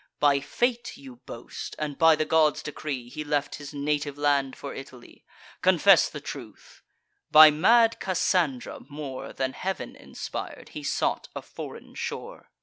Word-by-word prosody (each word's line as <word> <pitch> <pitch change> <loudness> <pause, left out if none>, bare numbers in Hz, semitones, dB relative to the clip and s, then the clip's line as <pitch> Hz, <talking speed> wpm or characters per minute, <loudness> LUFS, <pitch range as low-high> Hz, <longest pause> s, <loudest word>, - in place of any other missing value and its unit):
By 145 -1 +4
fate, 240 - -1
you 130 -3 -12
boast, 115 - -8
and 150 -2 -3
by 160 +1 +6
the 155 0 -1
gods' 155 -2 +3
decree, 140 -4 -5
He 140 +5 -6
left 145 -1 -1
his 145 - -8
native 145 0 -2
land 140 -2 +1
for 140 - -7
Italy! 130 -2 -12 0.4
Confess - - +5
the - - -7
truth; - - -10 0.5
by 155 0 +10
mad 225 +9 +4
Cassandra, 175 -7 0
more 145 -3 -6
Than 130 0 -2
Heav'n 190 +1 -4
inspir'd, - - -7
he 150 - -7
sought 140 - -1
a - - -5
foreign - - -9
shore! - - -6
145 Hz, 145 wpm, -26 LUFS, 140-155 Hz, 0.5 s, by